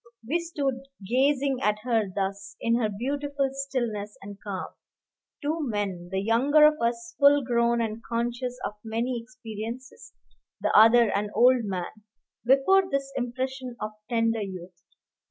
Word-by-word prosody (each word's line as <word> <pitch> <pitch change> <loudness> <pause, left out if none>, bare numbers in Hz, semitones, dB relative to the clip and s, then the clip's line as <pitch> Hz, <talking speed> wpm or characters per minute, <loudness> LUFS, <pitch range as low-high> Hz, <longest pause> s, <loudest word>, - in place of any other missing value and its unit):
We 330 +7 +1
stood 275 -6 -3 0.2
gazing 270 +2 +2
at 210 0 +2
her 225 -5 +1
thus, 200 0 -3
in 230 - +1
her 225 -3 +1
beautiful 275 +5 -2
stillness 240 -7 -3
and 200 0 -10
calm, 195 -3 -5 0.7
two 310 +3 -1
men, 205 - -3
the 190 - 0
younger 260 +9 +4
of 300 -2 +3
us 235 0 -1
full 285 0 +6
grown 235 -1 +2
and 225 0 -3
conscious 240 +2 -2
of - - -3
many 235 +2 -2
experiences, 235 0 -8 0.5
the - - 0
other 225 +1 +7
an 205 +1 -1
old 250 -1 +5
man, 185 -3 -3 0.5
before 275 +10 +4
this 275 -2 -2
impersonation 255 0 -3
of 215 - -4 0.2
tender 230 -2 +1
youth. 185 -2 -8
235 Hz, 140 wpm, -26 LUFS, 215-270 Hz, 0.7 s, other